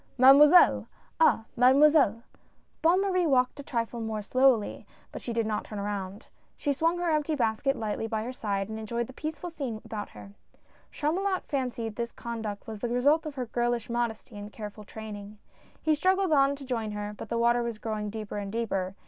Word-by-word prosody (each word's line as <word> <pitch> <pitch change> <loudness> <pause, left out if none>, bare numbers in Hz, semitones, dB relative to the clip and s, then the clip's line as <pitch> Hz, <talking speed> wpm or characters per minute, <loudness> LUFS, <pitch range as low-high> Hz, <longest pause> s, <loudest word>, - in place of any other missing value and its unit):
" - - -36
Mademoiselle 290 +7 +7 0.2
— - - -35
Ah! 465 - +4
Mademoiselle! 265 -2 +5 0.3
" - - -40
Bonne 345 +4 +4
Marie 365 -3 +1
walked 255 0 +2
a - - -6
trifle 235 -2 -3
more 220 -1 -3
slowly, 255 -2 +2 0.2
but - - -7
she 240 - -5
did 230 -1 0
not 215 -1 -2
turn 210 - -8
around. 200 +1 -4 0.3
She 285 - 0
swung 330 +5 +1
her 350 -1 0
empty 305 0 +1
basket 245 +2 0
lightly 220 -1 -3
by 220 -1 -2
her 250 +3 -5
side, 200 -5 -2
and 220 0 -6
enjoyed 235 +2 -2
the 260 - -12
peaceful 315 +5 -5
scene 265 -9 -4
about 210 -2 -5
her. 200 - -12 0.6
Chamulot 370 +6 -1
fancied 240 -5 -3
this 235 -1 -3
conduct 220 -3 -6
was 220 -2 -7
the 240 - -2
result 285 +7 +2
of 295 - -7
her 255 -2 -3
girlish 240 0 -1
modesty 235 -1 -3
and 205 +1 -8
careful 210 -1 -8
training. 210 -1 -9 0.5
He 315 - +3
struggled 375 +3 +2
on 280 -1 +4
to 275 -1 -10
join 225 -4 -3
her 210 0 -4
but 210 - -9
the 235 - -1
water 235 +1 +3
was 235 -2 -3
growing 215 -1 -3
deeper 215 -1 -6
and 200 -1 -5
deeper. 195 -4 -2
235 Hz, 200 wpm, -28 LUFS, 215-285 Hz, 0.6 s, Mademoiselle